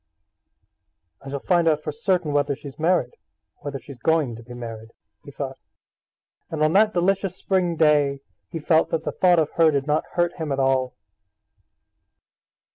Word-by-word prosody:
"I 135 - -8
shall 140 - -3
find 170 +3 +1
out 155 -1 +2
for 150 - -3
certain 175 +1 0
whether 145 -1 +1
she's 140 +1 -11
married, 175 +3 +1 0.5
or 145 - -6
when 135 - -5
she's 130 0 -12
going 155 -5 +1
to 115 - -11
be 120 +1 -11
married," 115 -2 -8 0.3
he - - -11
thought. - - -6 0.9
And 155 -1 -1
on 155 +1 +2
that 215 +1 +4
delicious 190 +1 +1
spring 180 -3 0
day 145 -3 +3 0.3
he - - -5
felt 160 +1 +2
that 160 -1 -2
the - - -2
thought 180 -2 +3
of 155 -2 +1
her 165 -1 +6
did 140 -3 0
not 150 +1 0
hurt 175 0 0
him 160 -4 -4
at 135 - -1
all. 130 -1 +1
155 Hz, 175 wpm, -23 LUFS, 140-170 Hz, 0.9 s, her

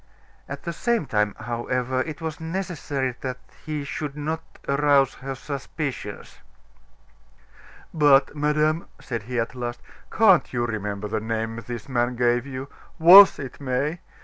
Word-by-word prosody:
At 140 +1 -6
the 170 - -4
same 235 -1 0
time, 105 -4 0
however, 125 +2 -1
it 155 +3 -6
was 160 -1 -4
necessary 160 -6 -3
that 130 -1 -4 0.3
he 150 -1 -4
should 145 0 -5
not 160 +2 -3 0.3
arouse 140 -1 +3
her 135 0 -4
suspicions. 140 -5 -6 1.5
"But, 145 -3 +4
madame," 150 +2 +1
said 115 -4 -4
he 125 -1 -1
at 115 +2 -2
last, 120 -1 -5 0.3
"can't 190 - +4
you 120 -1 0
remember 105 -2 -3
the 110 +1 -2
name 115 0 -3
this 120 -3 -6
man 120 -1 0
gave 120 +1 +1
you? 130 0 -6 0.3
Was 185 +5 +9
it 135 +1 -8
May? 140 +5 -1
135 Hz, 140 wpm, -24 LUFS, 120-155 Hz, 1.5 s, Was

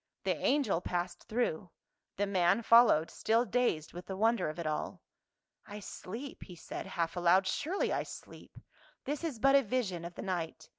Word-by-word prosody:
The - - +1
angel 265 - +1
passed 175 0 -3
through; 210 -7 -1 0.5
the 205 - +1
man 195 +2 +2
followed, 230 -9 +6
still 225 +2 +1
dazed 225 -9 0
with 175 +1 -9
the 190 - -5
wonder 225 -4 +2
of 155 - -7
it 170 - -4
all. 155 0 -3 0.6
"I 210 0 -7
sleep," 225 +7 -8
he 180 - -10
said 165 - -7
half 170 0 -2
aloud, 180 +2 +4
"surely 330 - -1
I - - 0
sleep. - - -11 0.5
This 290 +3 -3
is 310 -8 -3
but 275 +4 +4
a 280 - +7
vision 210 -8 -2
of 170 0 -7
the - - -6
night. 175 -4 -4
195 Hz, 180 wpm, -32 LUFS, 175-240 Hz, 0.6 s, a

